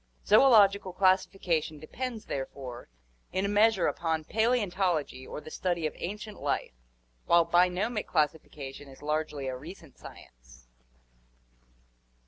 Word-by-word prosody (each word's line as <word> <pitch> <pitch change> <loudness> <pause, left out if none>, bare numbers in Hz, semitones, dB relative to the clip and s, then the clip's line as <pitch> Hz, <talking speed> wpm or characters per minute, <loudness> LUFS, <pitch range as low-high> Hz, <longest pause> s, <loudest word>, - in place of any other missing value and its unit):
Zoological 205 -5 +5
classification 185 -4 +1
depends 230 - -6
therefore 130 - -6 0.4
in 190 +1 0
a - - +1
measure 205 -1 +3
upon 160 -2 -1
Paleontology 185 - 0
or - - -6
the 155 - -11
study 175 -3 -1
of 155 - -2
ancient 210 +3 -6
life, - - -2 0.5
while 170 -1 +5
bionomic 180 +6 +1
classification 150 -3 -2
is 135 +1 -14
largely 150 -2 -2
a 130 - -3
recent 160 +1 -12
science. - - -15
170 Hz, 110 wpm, -29 LUFS, 150-200 Hz, 0.5 s, Zoological